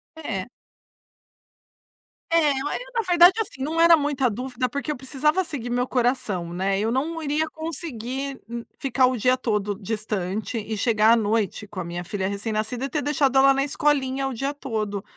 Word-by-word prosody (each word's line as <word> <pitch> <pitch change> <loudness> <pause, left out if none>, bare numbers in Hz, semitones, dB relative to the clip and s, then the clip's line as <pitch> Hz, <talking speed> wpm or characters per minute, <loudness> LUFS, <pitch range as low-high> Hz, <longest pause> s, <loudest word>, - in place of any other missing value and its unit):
É. 225 -12 -4 1.8
É, 320 -3 +4
e 270 0 -2 0.3
na 465 - +2
verdade 350 +1 +7
assim, 280 -11 -4
não 320 +3 -2
era 335 0 +8
muita 285 -4 +1
dúvida, 250 +3 -3
porque 280 +4 -3
eu 300 - -2
precisava 300 +7 +1
seguir 255 -7 -5
meu 245 +1 0
coração, 235 -9 0
né. 195 +2 0
Eu 220 +2 0
não 320 +6 -1
iria 305 +1 0
conseguir 275 -4 -5
n 235 0 -5
ficar 265 -1 +2
o 255 -1 -1
dia 255 +4 +3
todo 210 -4 -1
distante 215 0 -3
e 220 0 -3
chegar 220 0 +4
à - - +6
noite 215 -1 0
com 190 - -8
a - - -2
minha 175 +1 -5
filha 190 +1 -3
recém-nascida 215 +5 -2
e - - -4
ter 300 - -1
deixado 275 -2 +2
ela 275 0 +7
na 275 0 +1
escolinha 275 -2 0
o 265 - -3
dia 275 +5 -2
todo. 215 -8 -3
255 Hz, 180 wpm, -24 LUFS, 215-285 Hz, 1.8 s, era